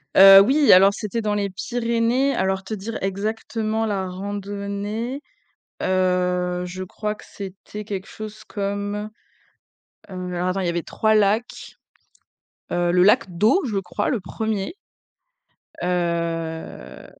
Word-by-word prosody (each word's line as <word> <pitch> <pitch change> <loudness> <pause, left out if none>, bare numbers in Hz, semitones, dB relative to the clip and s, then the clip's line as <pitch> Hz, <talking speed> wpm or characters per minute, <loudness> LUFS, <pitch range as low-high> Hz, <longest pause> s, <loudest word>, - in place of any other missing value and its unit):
Heu, 195 0 +11
oui, 275 +7 +4
alors 195 +2 +7
c'était 215 +3 -3
dans 210 -1 0
les 205 -1 -1
Pyrénées, 235 +6 0
alors 190 0 0
te 205 +3 -6
dire, 215 +3 -5
exactement, 215 +3 -2
la 195 -2 -1
randonnée, 205 +5 -4 0.6
heu, 180 -1 +1
je 180 +1 -6
crois 210 +3 -4
que - - -15
c'était 200 +2 -8
quelque 195 -1 -5
chose 215 0 -8
comme, 205 +1 -3 1.0
heu, 180 -1 -5
alors 180 +1 0
attends, 190 +1 -1
il 185 - -1
y - - +1
avait 170 0 -1
3 220 0 +1
lacs, 240 +4 0 0.9
heu, 175 0 +1
le 180 0 +4
lac 190 -2 +3
d'eau, 220 - +3
je 210 -5 -1
crois, 195 +2 -2
le 250 - 0
1er, 220 - -3 1.1
heu 170 -2 -3
200 Hz, 135 wpm, -23 LUFS, 185-215 Hz, 1.1 s, Heu